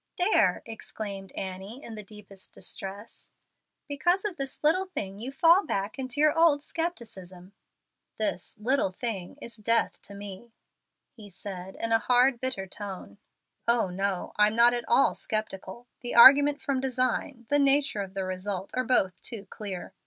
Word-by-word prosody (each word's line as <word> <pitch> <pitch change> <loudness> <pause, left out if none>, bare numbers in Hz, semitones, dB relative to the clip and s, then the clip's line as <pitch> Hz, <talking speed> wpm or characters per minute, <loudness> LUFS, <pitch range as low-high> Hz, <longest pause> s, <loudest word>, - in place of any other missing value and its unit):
"There," 365 +4 +3
exclaimed 205 -4 -7
Annie, 190 +7 -6
in 230 - -8
the 215 - -6
deepest 200 -2 -13
distress; 200 +3 -6 0.6
"because 345 +8 +1
of 405 -4 -2
this 275 -1 -6
little 365 +6 +3
thing 200 - -5
you 245 +5 -5
fall 335 +7 +5
back 200 -3 -3
into 260 +1 -3
your 305 +1 +4
old 325 -3 +4
scepticism." 200 - -6 0.6
"This 215 -4 -2
'little 240 -1 +1
thing' 200 0 -4
is 235 - -9
death 230 +2 0
to 200 - -9
me," 205 +3 -10 0.6
he 210 -3 -13
said, 190 0 -7
in 230 - -2
a 225 - +5
hard, 250 +2 +3
bitter 260 -7 -2
tone. 190 - -8 0.5
"Oh 235 -5 +2
no, 195 0 -2
I'm 210 +1 +4
not 235 +1 +6
at 240 -1 -2
all 255 +3 +4
sceptical. 215 +1 -4
The 245 - -4
'argument 285 +4 +8
from 275 -2 -1
design,' 255 -1 -1
the 290 - +4
nature 275 -5 +3
of 195 0 -7
the 195 - -2
result, 185 +1 -4
are 255 - 0
both 190 -8 +1
too 215 -4 -7
clear. 195 -4 -7
225 Hz, 160 wpm, -28 LUFS, 195-270 Hz, 0.6 s, argument